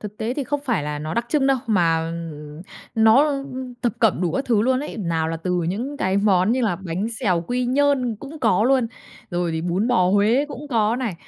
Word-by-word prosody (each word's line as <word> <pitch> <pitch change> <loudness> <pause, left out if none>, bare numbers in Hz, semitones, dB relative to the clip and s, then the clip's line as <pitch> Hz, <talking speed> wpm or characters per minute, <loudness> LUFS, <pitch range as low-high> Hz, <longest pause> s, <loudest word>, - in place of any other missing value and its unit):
Thực 210 0 -8
tế 230 +3 -2
thì 285 - -2
không 290 +3 -2
phải 235 - 0
là 150 0 -3
nó 155 +2 -4
đặc 235 0 -1
trưng 280 0 +2
đâu, 270 -1 +3
mà, 165 -6 +2
ừm, 155 -2 -7 0.3
nó, 225 +5 +5
ưm, 275 -1 -4
ư, 255 -1 -6
thập 240 - +1
cẩm 220 -6 +3
đủ 175 -3 0
các 270 - -1
thứ 225 -5 +2
luôn 255 +2 +2
ấy, 295 - -6
nào 165 -5 -1
là 165 - -2
từ 180 +1 -1
những 245 +10 -3
cái 190 -5 0
món 200 0 +3
như 255 - 0
là 205 -7 +1
bánh 190 +3 -3
xèo 185 -8 +1
Quy 250 +1 -1
Nhơn 260 -3 +1
cũng 280 +7 -10
có 220 -3 +3
luôn, 255 -1 +3 0.4
rồi 175 -1 -1
thì 160 0 -2
bún 180 +6 0
bò 180 -7 +3
Huế 215 +7 +3
cũng 290 +1 -8
có 225 -3 +1
này, 240 -7 -2
220 Hz, 240 wpm, -22 LUFS, 175-255 Hz, 0.4 s, nó